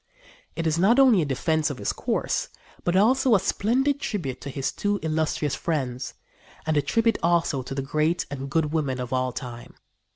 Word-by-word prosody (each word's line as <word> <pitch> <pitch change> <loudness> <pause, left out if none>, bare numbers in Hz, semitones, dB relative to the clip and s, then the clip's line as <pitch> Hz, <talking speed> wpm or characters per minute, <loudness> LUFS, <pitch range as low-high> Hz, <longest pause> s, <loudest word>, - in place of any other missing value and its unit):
It 165 - -3
is 160 +1 +1
not 210 +7 +4
only 250 -9 +6
a - - 0
defence 155 +3 0
of 140 - -5
his 100 - -2
course, - - -1 0.3
but 175 - 0
also 240 +4 +4
a - - +4
splendid 265 +10 +1
tribute 145 - -3
to 140 - -6
his 135 0 -2
two 205 0 -1
illustrious 155 -2 0
friends, 130 -7 -3 0.5
and 160 -1 +1
a 145 - +4
tribute 230 +10 +1
also 170 -4 +2
to 130 +1 -6
the 135 - -2
great 155 +5 0
and 135 -1 -5
good 155 +1 0
women 140 -5 -1
of 125 0 -4
all 130 0 +1
time. 120 -2 -8
155 Hz, 190 wpm, -25 LUFS, 135-190 Hz, 0.5 s, only